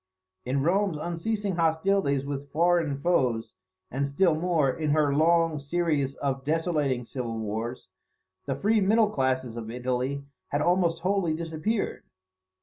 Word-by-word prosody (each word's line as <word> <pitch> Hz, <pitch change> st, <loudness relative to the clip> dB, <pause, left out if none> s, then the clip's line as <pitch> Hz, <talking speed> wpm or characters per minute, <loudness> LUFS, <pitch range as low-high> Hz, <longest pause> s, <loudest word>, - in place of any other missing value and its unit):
In 135 Hz, +2 st, 0 dB
Rome's 190 Hz, +1 st, +1 dB
unceasing 180 Hz, +4 st, -2 dB
hostilities 160 Hz, -3 st, +1 dB
with 140 Hz, 0 st, -5 dB
foreign 165 Hz, -3 st, +2 dB
foes, 130 Hz, -8 st, 0 dB, 0.4 s
and, 140 Hz, +2 st, -1 dB
still 165 Hz, +5 st, +3 dB
more, 160 Hz, -2 st, +1 dB
in 155 Hz, +2 st, -2 dB
her 150 Hz, -2 st, +3 dB
long 165 Hz, +1 st, +3 dB
series 145 Hz, -2 st, 0 dB
of 135 Hz, -1 st, -2 dB
desolating 150 Hz, -4 st, 0 dB
civil 120 Hz, -3 st, -4 dB
wars, 110 Hz, +3 st, -4 dB, 0.6 s
the 135 Hz, -, 0 dB
free 215 Hz, +1 st, +2 dB
middle 210 Hz, +2 st, +3 dB
classes 130 Hz, -, 0 dB
of 115 Hz, -2 st, -6 dB
Italy 125 Hz, +3 st, -2 dB, 0.2 s
had 145 Hz, -, -1 dB
almost 170 Hz, -2 st, +2 dB
wholly 185 Hz, -4 st, +1 dB
disappeared. 165 Hz, +6 st, -2 dB
155 Hz, 135 wpm, -27 LUFS, 135-175 Hz, 0.6 s, still